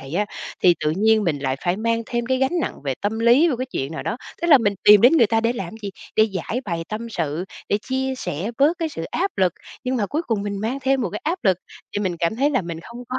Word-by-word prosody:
vậy 135 +4 -8
á, 205 +2 +1 0.4
thì 175 -2 +6
tự 150 - +3
nhiên 220 0 +3
mình 155 -4 0
lại 135 -1 -1
phải 175 +2 +1
mang 230 +1 0
thêm 240 -1 -2
cái 260 0 +1
gánh 300 +7 +1
nặng - - -4
về 135 - -1
tâm 210 +2 -1
lý 245 +9 +5
vô 260 - 0
cái 255 - -3
chuyện 145 - -4
nào - - -5
đó. 225 - -2 0.3
Tức - - +1
là 285 - +9
mình 205 -4 +1
tìm 210 -1 +9
đến 245 +8 +7
người 235 -8 +6
ta 225 +1 +2
để 230 +1 +1
làm 195 -5 -6
gì? 200 - -4 0.3
Để 220 0 +5
giãi 220 +7 -2
bày 170 -4 -3
tâm 220 +2 -5
sự, 165 -2 -2 0.2
để 205 - +2
chia 265 0 -1
sẻ 185 - -3
bớt 300 +5 +3
cái 330 - -1
sự 165 - -6
áp 385 - -1
lực. 185 -2 +3 0.3
Nhưng 255 0 0
mà 205 -4 0
cuối 305 +8 -2
cùng 215 -4 0
mình 200 -1 -3
mang 240 +6 -2
thêm 270 0 +2
một 235 - -1
cái 210 - -5
áp 345 +4 0
lực 190 -3 +3 0.3
thì 205 - -2
mình 180 -3 -1
cảm 170 +6 0
thấy 280 +4 +2
là 260 -9 +1
mình 170 -1 -6
không 235 +7 -11
có, 255 +1 -2
220 Hz, 285 wpm, -22 LUFS, 185-255 Hz, 0.4 s, là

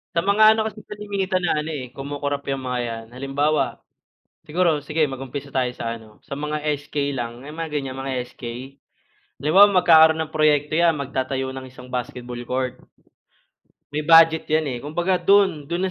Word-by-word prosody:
Sa 170 - +2
mga 215 +2 +6
ano 220 - 0
kasi 215 0 -8
kalimitan 200 -3 -2
na 165 - +1
ano 150 +1 -4 0.2
kumukurap 140 +1 -4
'yong 135 -1 -2
mga 125 -1 -2
'yan 115 -1 -6
halimbawa 135 +2 -1 0.7
siguro 160 -2 +1
sige 155 +1 0
mag-umpisa 135 +1 -7
tayo 125 -2 +1
sa 115 -2 -4
ano 110 -2 -14
sa - - -5
mga 150 +1 -3 0.2
SK 140 -1 -2
lang 120 -1 -5
may 150 - -8
mga 165 -1 -5
ganyan 135 -2 -5
mga 135 -1 -3 0.2
SK - - -13 1.0
'di 150 - -2
ba 205 +2 +8
magkakaroon 160 -4 +6
ng 155 - -18
proyekto 150 -1 +2
'yan 165 -1 +3
magtatayo 130 -1 -3
ng 130 -1 -8
isang 125 0 -13
basketball 125 0 -5
court, 130 -1 -2 1.1
may 150 0 -3
budget 165 -1 +6
'yan 155 -5 0
kumbaga 175 +6 -1
do'n 190 -7 +3
do'n 180 +2 -1
145 Hz, 165 wpm, -22 LUFS, 130-165 Hz, 1.1 s, ba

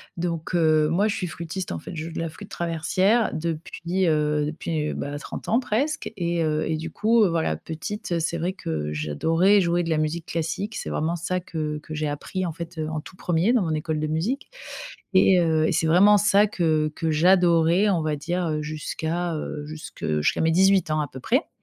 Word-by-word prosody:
Donc, 170 0 -3
heu, 155 -2 +4
moi 200 +6 +2
je 200 - -1
suis 180 - -3
flutiste 170 +3 -5
en - - -4
fait, - - -9
je 155 0 -4
joue 165 - -7
de - - -4
la 165 - -2
flûte 200 +5 -11
traversière 185 +7 +1
depuis, 170 +3 -2
heu, 150 -1 +1
depuis, 155 -1 -3
heu, - - -4
bah, 145 +1 -4
30 - - -7
ans 230 - +4
presque 260 +2 -1
et 170 -2 -1
heu 155 0 0
et 160 -1 -1
du 160 +1 -6
coup, 225 +4 +3
heu, - - +2
voilà 165 -1 0
petite, 170 +2 -4
c'est 165 +1 -1
vrai 175 +3 -1
que 75 - -4
j'adorais 165 - +2
jouer 175 0 +1
de 165 - -4
la 160 - +2
musique 155 +2 -1
classique, 170 +6 -3
c'est - - -4
vraiment 165 +3 -1
ça 180 +2 -2
que 155 -3 -4
que 155 - -10
j'ai 150 0 -1
appris 165 +6 -3
en 165 - -3
fait, 170 +1 -8
heu, 155 - -2
en 155 -1 -3
tout 180 - -14
1er 175 +5 +1
dans 235 -6 +3
mon 160 - -1
école 155 0 -2
de 155 - -1
musique 175 - -2 0.7
et 185 -1 +6
heu 160 -2 +2
et - - +1
c'est 160 - +1
vraiment 195 +6 +6
ça 205 +1 +4
que 160 -6 0
que 165 -1 -1
j'adorais, 175 +3 +4
on 170 -5 +1
va 155 -1 -1
dire, 175 +4 -2
heu, 155 -1 -1
jusqu'à, 160 +3 -3
heu 150 -1 -5
jusque 155 +1 -9 0.2
jusqu'à 75 - +1
mes 160 - +3
dix-huit 190 0 +4
ans 155 0 +1
à 150 - -2
peu 130 0 -10
près. 260 - 0
165 Hz, 220 wpm, -24 LUFS, 155-185 Hz, 0.7 s, et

